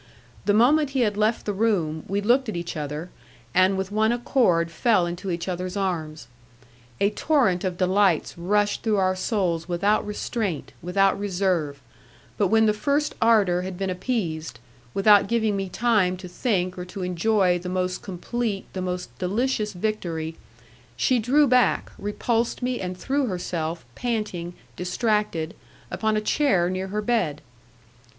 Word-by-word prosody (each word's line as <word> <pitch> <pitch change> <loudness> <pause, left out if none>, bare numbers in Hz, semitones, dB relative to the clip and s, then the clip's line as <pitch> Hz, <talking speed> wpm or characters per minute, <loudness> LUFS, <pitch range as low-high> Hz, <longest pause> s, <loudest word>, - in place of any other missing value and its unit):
The 205 - +3
moment 285 +6 +4
he - - +3
had 210 -3 +1
left 215 +2 +1
the 205 - -1
room 185 -8 0
we 200 +2 -1
looked 245 +4 +2
at 215 - -4
each 170 0 -5
other, 150 +3 -5 0.4
and 185 +1 +4
with 190 +1 -3
one 220 +2 +2
accord 230 - +2
fell 185 +1 +2
into 175 +3 -5
each 170 0 -3
other's 185 +1 -3
arms. 160 -8 -3 0.7
A 200 +1 +3
torrent 215 - +2
of 185 -2 -2
delights 185 -2 +2
rushed 205 +4 +1
through 220 -2 +1
our 185 -1 +2
souls 180 -4 -1
without 200 +5 +2
restraint, 210 - -3
without 195 +3 +2
reserve, 180 -7 -1 0.6
but 200 - +2
when 220 +3 +4
the 210 - +3
first 285 +7 0
ardour 205 -6 +4
had 185 0 -5
been 195 0 -2
appeased, 170 - -3 0.4
without 205 0 +6
giving 220 -2 +1
me 195 -1 -3
time 200 -4 +2
to 185 0 -9
think 180 -1 -1
or 180 - -5
to 185 +1 -6
enjoy 180 0 +2
the 180 +1 -6
most 185 0 -1
complete, 200 +3 -3
the 185 - -3
most 180 0 -4
delicious 215 +3 0
victory, 175 -5 -3 0.6
she 255 -2 +2
drew 270 +7 +4
back, 250 -2 +2
repulsed 230 +4 -1
me, 250 -1 -1
and 180 -1 -4
threw 275 +5 0
herself, 170 -4 -3
panting, 210 -8 -3 0.2
distracted, 180 -3 -1 0.4
upon 220 -1 0
a - - 0
chair 210 -8 +2
near 185 +1 -3
her 210 +2 -3
bed. 205 -11 0
195 Hz, 155 wpm, -24 LUFS, 180-220 Hz, 0.7 s, without